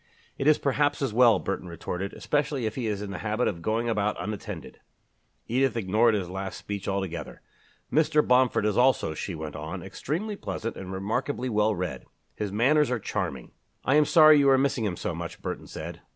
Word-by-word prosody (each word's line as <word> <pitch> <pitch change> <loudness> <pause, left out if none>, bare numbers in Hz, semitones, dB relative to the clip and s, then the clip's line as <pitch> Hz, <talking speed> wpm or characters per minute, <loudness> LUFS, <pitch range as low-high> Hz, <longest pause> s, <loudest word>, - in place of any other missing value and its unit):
"It 135 - -2
is 155 - +6
perhaps 145 +1 +1
as 130 - -1
well," 120 -1 +6
Burton 95 -1 -4
retorted, 90 +3 -4
"especially 145 -4 -1
if 110 - -1
he 120 -2 -3
is 105 -1 -2
in 100 - -6
the 95 - -5
habit 110 +5 0
of 85 -5 -3
going 110 +5 0
about 105 -2 0
unattended." 105 -1 -6 0.7
Edith 130 +1 +1
ignored 110 +2 +3
his 95 -4 -2
last 95 +1 -5
speech 100 -1 -6
altogether. 95 -3 -4 0.5
"Mr. 150 0 +3
Bomford 125 -4 +3
is 105 -2 +1
also," 125 -9 +3
she 85 +3 -5
went 80 -1 -6
on, 80 +1 -6
"extremely 200 +9 -4
pleasant 115 - -5
and 95 -1 -7
remarkably 125 +7 -2
well 105 -1 +2
read. 90 -1 -4 0.3
His 105 -2 -4
manners 135 +8 +3
are 125 - 0
charming." 70 - -4 0.3
"I 135 - +3
am 150 0 +5
sorry 155 -1 +7
you 140 -1 +5
are 135 - +6
missing 130 -4 +1
him 90 -4 -2
so - - -3
much," - - -6
Burton - - -5
said. - - -7
110 Hz, 195 wpm, -27 LUFS, 95-135 Hz, 0.7 s, sorry